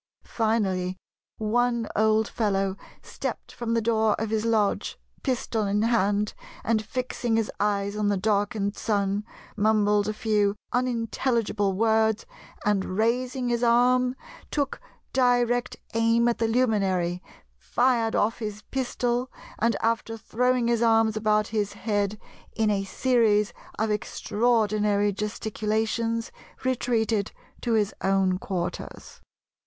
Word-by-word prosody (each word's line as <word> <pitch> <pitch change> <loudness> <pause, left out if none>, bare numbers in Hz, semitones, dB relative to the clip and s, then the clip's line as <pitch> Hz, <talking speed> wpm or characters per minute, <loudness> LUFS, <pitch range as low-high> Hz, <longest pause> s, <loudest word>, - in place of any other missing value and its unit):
Finally 190 -5 0 0.4
one 235 +1 +1
old 220 +1 +3
fellow 195 -4 0 0.3
stepped - - -5
from 230 -1 -2
the 230 - +2
door 220 -1 +2
of 220 0 -2
his 220 0 0
lodge, 220 -3 +1 0.2
pistol 235 -5 -1
in 205 +2 +1
hand, 210 -2 +1 0.3
and 220 -1 +1
fixing 240 0 -2
his 225 -1 0
eyes 200 0 0
on 210 -1 0
the 205 -1 +2
darkened 205 0 0
Sun, 200 -1 0 0.3
mumbled 210 -1 +3
a 215 - -1
few 210 -2 +1 0.2
unintelligible 230 -4 0
words 220 +1 +2 0.4
and 195 -2 0
raising 245 +3 0
his 240 -1 0
arm 250 +2 +4 0.3
took 285 - -2 0.3
direct 245 -1 +2 0.2
aim 230 +1 +3
at 240 - 0
the 225 - +2
luminary, 195 -7 +1 0.3
fired 235 - +1
off 225 +3 +1
his 210 -2 -5
pistol, 250 -1 -1 0.3
and 230 0 +2
after 225 0 0
throwing 250 +2 +1
his 235 -1 +1
arms 225 -1 +4
about 215 0 +2
his 210 -2 -1
head 205 -1 -1 0.4
in 220 -2 +2
a 195 -1 0
series 215 -2 +2 0.2
of 220 0 0
extraordinary 210 -1 +1
gesticulations 220 +2 -2 0.3
retreated 230 -5 0 0.3
to 235 - 0
his 210 -3 +2
own 190 -1 +2
quarters. 180 -3 -5
220 Hz, 120 wpm, -26 LUFS, 205-235 Hz, 0.4 s, arm